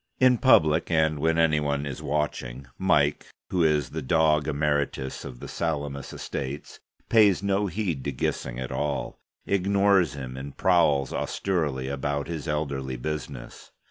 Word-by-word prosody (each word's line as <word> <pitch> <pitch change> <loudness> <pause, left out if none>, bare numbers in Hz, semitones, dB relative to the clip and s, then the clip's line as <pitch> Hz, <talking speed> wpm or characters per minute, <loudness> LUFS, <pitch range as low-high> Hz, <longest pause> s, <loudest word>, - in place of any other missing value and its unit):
In 125 -2 +5
public, 80 - +4
and 80 -3 +2
when 80 +2 +1
any 80 -2 +3
one 70 -1 -1
is 70 -3 -5
watching, 70 -3 -3
Mike, 75 -6 +2 0.2
who 90 -2 +2
is 75 -5 +2
the 80 - -4
Dog 75 +1 +2
Emeritus 75 -3 -1
of 65 -3 -9
the - - -8
Salamis 70 -4 -3
Estates, 70 +2 -6 0.3
pays 105 -4 +4
no 100 +1 +1
heed 90 -7 -2
to 70 - -1
Gissing 60 -1 -3
at 65 -1 -5
all: 75 -1 -3 0.3
ignores 100 -3 +2
him, 65 -2 -7
and 70 +1 -8
prowls 80 -7 +3
austerely 75 -9 -1
about 70 +1 -2
his 80 -1 -5
elderly 70 -4 -2
business. 75 +5 -6
75 Hz, 145 wpm, -26 LUFS, 70-85 Hz, 0.3 s, In